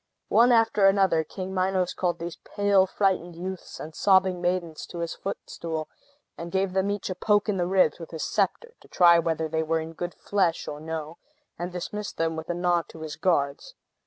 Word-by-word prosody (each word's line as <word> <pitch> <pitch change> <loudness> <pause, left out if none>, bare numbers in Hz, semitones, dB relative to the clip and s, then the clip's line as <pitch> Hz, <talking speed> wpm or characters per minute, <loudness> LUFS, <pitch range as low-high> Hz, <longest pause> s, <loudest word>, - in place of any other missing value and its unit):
One 240 +2 +5
after 225 -4 +4
another, 195 -5 +3
King 190 +3 -6
Minos 185 -1 +1
called 175 -2 -1
these 170 -1 -6
pale, 200 -2 +2
frightened 185 -3 0
youths 185 +2 -7
and 155 - -7
sobbing 190 0 +3
maidens 175 -3 -2
to 175 - -9
his 170 -1 -3
footstool, 165 -5 -5 0.6
gave 190 0 0
them 190 +1 +1
each 205 -2 -2
a - - 0
poke 205 +3 +2
in 205 -2 0
the 175 -1 0
ribs 185 -5 +3
with 165 - -8
his 160 -2 -5
sceptre 475 -1 -1
(to - - -19
try 170 -1 +6
whether 160 -1 -1
they 160 +1 -1
were 160 +1 0
in 160 +1 -6
good 175 +1 -5
flesh 190 -5 0
or 145 - -5
no), 160 0 -5 0.4
and 175 +1 -3
dismissed 205 +4 -5
them 165 0 0
with 160 +1 -7
a 175 - -1
nod 175 -1 +1
to 160 - -11
his 155 -1 -5
guards. 165 - 0
175 Hz, 195 wpm, -26 LUFS, 165-190 Hz, 0.6 s, try